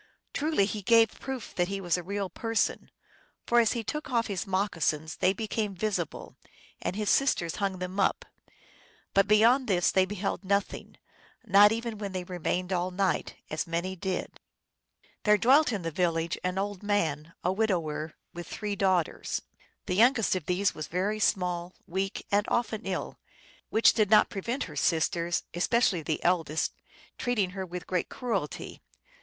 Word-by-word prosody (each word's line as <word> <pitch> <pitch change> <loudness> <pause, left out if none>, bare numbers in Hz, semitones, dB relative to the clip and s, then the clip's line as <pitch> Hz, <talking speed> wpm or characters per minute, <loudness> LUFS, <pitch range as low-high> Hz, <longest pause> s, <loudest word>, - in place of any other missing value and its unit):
Truly 300 -9 +2
he 210 +1 -4
gave 225 +2 +4
proof 265 -4 -6
that 175 -1 +1
he 195 +1 -3
was 175 -3 +1
a 180 - -2
real 200 +2 -3
person, 225 +5 -1 0.6
for 240 - +4
as 230 -2 +3
he 235 -2 -3
took 300 +5 -4
off 235 -3 +1
his 200 -1 -3
moccasins 165 -5 -1
they 185 - +3
became 210 0 -2
visible, 185 -4 -3 0.5
and - - -2
his 210 0 -2
sister 265 -11 +2
hung 195 -2 -1
them 185 +2 -5
up; 195 - +1 0.9
but 195 0 +4
beyond 230 +5 +5
this 180 -4 +3
they 190 -1 +4
beheld 200 +1 -3
nothing 200 +1 -2 0.5
not 205 +2 +7
even 230 -1 -3
when 200 -2 -5
they 185 -1 -3
remained 180 +1 -2
all 180 0 0
night, 185 +1 -1 0.2
as 155 +4 -2
many 170 +3 -2
did. 190 0 -4 0.8
There 210 0 +4
dwelt 270 +7 +5
in 200 -5 -3
the 165 - -2
village 165 -1 0
an 180 +1 -1
old 200 -1 -2
man, 165 -7 -1
a 180 - +1
widower, 170 -7 -1 0.2
with 175 -1 -7
three 210 -1 -4
daughters. 185 -4 0 0.4
The - - -2
youngest 225 +1 +4
of 180 -5 -4
these 185 +2 +1
was 155 - -6
very 195 +5 -1
small, 180 -3 0
weak, 190 +2 -3
and 205 +1 +2
often 225 -3 -1
ill, 190 - -4 0.5
which 225 - +5
did 215 -3 +2
not 215 - +5
prevent 235 +8 -2
her - - -9
sisters, 170 +1 +1
especially 185 +1 +2
the 155 0 -3
eldest, 165 -3 +1 0.5
treating 215 -7 0
her 190 -1 -5
with 180 -1 -6
great 180 -2 -1
cruelty. 220 - -4
195 Hz, 165 wpm, -28 LUFS, 180-215 Hz, 0.9 s, not